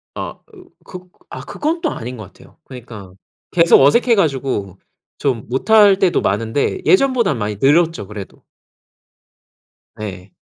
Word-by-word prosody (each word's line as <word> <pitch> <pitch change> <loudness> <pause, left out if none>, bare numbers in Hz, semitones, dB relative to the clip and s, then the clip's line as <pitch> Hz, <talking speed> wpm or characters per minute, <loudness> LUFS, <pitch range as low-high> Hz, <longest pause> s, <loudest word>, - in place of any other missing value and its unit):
아 - - -6
으 365 -3 -16 0.2
극 180 0 -11 0.2
아, - - -8
그건 320 +3 -3
또 320 - -1
아닌 125 +3 -7
것 110 - -8
같아요. - - -20
그러니까 110 -7 -11 0.4
계속 170 -4 +5
어색해 230 - +4
가지고 135 - -2 0.4
좀 125 -6 -2
못할 205 - +4
때도 180 -3 +2
많은데 115 - -1
예전보다는 255 - +2
많이 105 -1 -3
늘었죠, 160 - +2
그래도. 105 -2 -10 1.5
네. 95 -3 -8
140 Hz, 270 characters per minute, -18 LUFS, -, 1.5 s, 계속